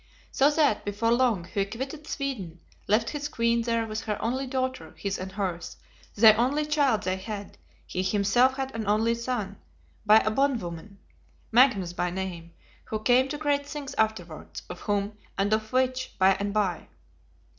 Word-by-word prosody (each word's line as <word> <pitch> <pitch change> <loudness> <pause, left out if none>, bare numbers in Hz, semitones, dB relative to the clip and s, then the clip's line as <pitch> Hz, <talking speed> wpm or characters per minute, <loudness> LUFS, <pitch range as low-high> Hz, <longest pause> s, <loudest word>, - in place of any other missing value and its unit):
So 275 +2 +4
that, 295 -8 +2
before 210 +3 0
long, 235 -7 +2
he 195 +3 -1
quitted 270 +9 -6
Sweden; 210 - -4 0.3
left 220 +3 +2
his 295 -1 -3
queen 235 -2 +1
there 230 -1 0
with 215 0 -4
her 210 -1 -2
only 260 +4 -2
daughter, 260 0 -3
his 200 -1 -3
and 190 +1 -6
hers, 185 -4 -4 0.4
the 220 0 +8
only 275 +6 +1
child 290 -7 +2
they 185 0 -1
had; 200 +1 -7 0.3
he 185 - -3
himself 210 +7 +3
had 270 0 -3
an 225 -2 -4
only 220 +3 +2
son, 235 -4 -3 0.5
"by 215 0 +7
a 215 0 +2
bondwoman," 210 -8 -1 0.5
Magnus 220 -8 +4
by 175 0 -1
name, 175 -2 -5 0.3
who 215 - -3
came 250 +4 +4
to 295 - -3
great 285 -1 0
things 290 -2 -6
afterwards; 185 -8 -2
of 180 - -8
whom, 205 0 -2 0.2
and 200 +2 +1
of 220 0 -1
which, 255 0 0
by 190 0 +5
and 200 +1 -3
by. 200 -4 -1
220 Hz, 165 wpm, -27 LUFS, 200-260 Hz, 0.5 s, the